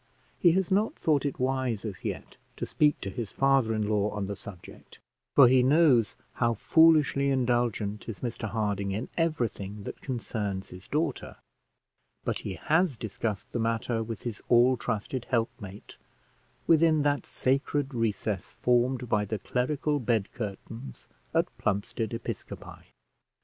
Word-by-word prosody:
He 170 -2 +5
has 190 +1 0
not 205 +3 +2
thought 150 -3 +1
it 140 - -5
wise 130 -4 -1
as 100 -4 -6
yet - - -5 0.2
to - - -2
speak 150 -1 +2
to 100 - -4
his 115 0 -5
father 135 -4 +3
in 110 -1 0
law 105 -1 +1
on 105 -1 -3
the 100 +1 -4
subject, 95 -2 -12 0.4
for 140 - +9
he 130 +1 +5
knows 130 -4 +4 0.2
how 115 -1 +1
foolishly 150 +1 +4
indulgent 120 -5 0
is 105 - -7
Mr 115 -2 -3
Harding 100 -2 -1
in 110 +6 -4
everything 115 - -2
that - - -7
concerns 105 -6 -3
his 90 +1 -12
daughter; 155 +3 -2 0.9
but - - -1
he 95 - -5
has 160 - +1
discussed 110 -2 -4
the 120 - -2
matter 115 0 0
with 110 -2 -6
his 115 -4 -5
all 125 +2 +6
trusted 120 +1 -3
helpmate, 115 -5 -3 0.7
within 160 -2 +4
that 145 -1 0
sacred 140 +1 0
recess 110 -4 -2
formed 125 +1 +1
by 105 -2 +2
the 105 +1 -3
clerical 145 +6 -1
bed 115 -5 0
curtains 110 - -7 0.3
at - - +4
Plumstead 100 +2 -1
Episcopi. 115 0 -7
120 Hz, 145 wpm, -28 LUFS, 105-135 Hz, 0.9 s, for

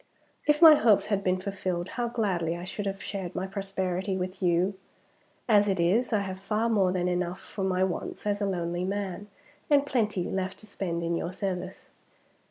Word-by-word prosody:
If 300 +2 +4
my 320 -1 +12
hopes 225 -8 +4
had 200 -1 0
been 185 0 +1
fulfilled, 185 -2 -3
how 240 0 -2
gladly 185 -8 -1
I 175 - -7
should 200 +2 -4
have 195 0 -4
shared 190 -4 -5
my 185 - -2
prosperity 190 -1 -2
with 185 +1 -4
you! 180 +2 +2 0.7
As 205 -3 +5
it 195 -2 0
is, 205 +9 +2
I 215 -3 +2
have 190 -1 -5
far 215 +4 0
more 195 -5 +3
than 180 -1 0
enough 180 0 -1
for 195 0 -6
my 185 -1 +1
wants 190 +2 -3
as 205 0 0
a 200 - +1
lonely 175 -1 -2
man, 200 +1 -3 0.4
and 285 -1 +4
plenty 215 -9 0
left 190 +1 -3
to - - -11
spend 175 -5 -3
in 170 0 0
your 170 +1 -2
service. 185 -1 -5
190 Hz, 190 wpm, -28 LUFS, 180-205 Hz, 0.7 s, my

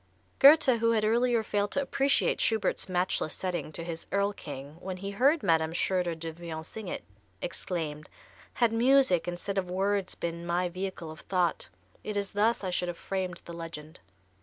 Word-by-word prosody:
Goethe, 275 -4 +7
who 230 0 +3
had 215 -1 +2
earlier 235 +1 +2
failed 205 -1 0
to 280 - +1
appreciate 275 +1 +2
Schubert's 220 -3 +1
matchless 180 -3 0
setting 180 -4 -3
to 165 - -1
his 165 -1 -6
"Erl 200 +1 +1
King," 145 -3 -8
when 185 0 -5
he 200 +2 -5
heard 275 +10 +3
Madame 160 -3 +2
Schröder 180 -1 0
Devrient 165 0 -6
sing 220 +2 -8
it, - - -4 0.4
exclaimed: 155 - -4 0.5
"Had 235 -2 +3
music 245 -7 +4
instead 185 +3 -2
of 180 -2 -4
words 195 +1 0
been 170 0 -4
my 175 +1 0
vehicle 185 -2 -5
of 155 - -11
thought, 180 - 0 0.3
it 210 -1 -3
is 200 -1 -2
thus 215 +2 +2
I 185 - -2
should 180 0 0
have 175 -1 -4
framed 185 -3 -4
the 170 - -8
legend." 165 -2 -8
185 Hz, 175 wpm, -29 LUFS, 170-210 Hz, 0.5 s, Goethe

